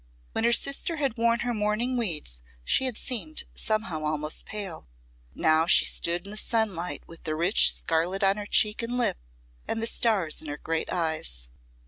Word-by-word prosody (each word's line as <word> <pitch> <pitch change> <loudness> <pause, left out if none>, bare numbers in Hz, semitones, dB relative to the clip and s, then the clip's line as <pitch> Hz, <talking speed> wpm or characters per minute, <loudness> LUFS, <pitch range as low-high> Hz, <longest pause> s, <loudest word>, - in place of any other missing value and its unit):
When 225 - -1
her 235 - +4
sister 275 +7 +2
had 275 -6 -1
worn 235 0 +1
her 245 0 -1
mourning 215 +4 -1
weeds 155 - -2 0.2
she 265 - +2
had 250 -4 -1
seemed 285 +5 -1
somehow 215 -8 -2
almost 150 0 -2
pale; 195 - -6 0.5
but - - -15
now 160 +1 +4
she - - +6
stood 175 +2 0
in 200 - -8
the 210 - -5
sunlight 210 -6 -1
with 165 - -13
the 155 -3 -2
rich 175 +6 +6
scarlet 175 +5 -1
on 195 +1 +3
her 205 -1 -6
cheek 210 +1 +3
and 235 +2 -3
lip, 245 - +1 0.5
and 225 - -2
the 225 - 0
stars 210 -9 +1
in 155 - -9
her 145 0 -5
great 165 +1 -3
eyes. 155 - -2
200 Hz, 185 wpm, -26 LUFS, 160-230 Hz, 0.5 s, she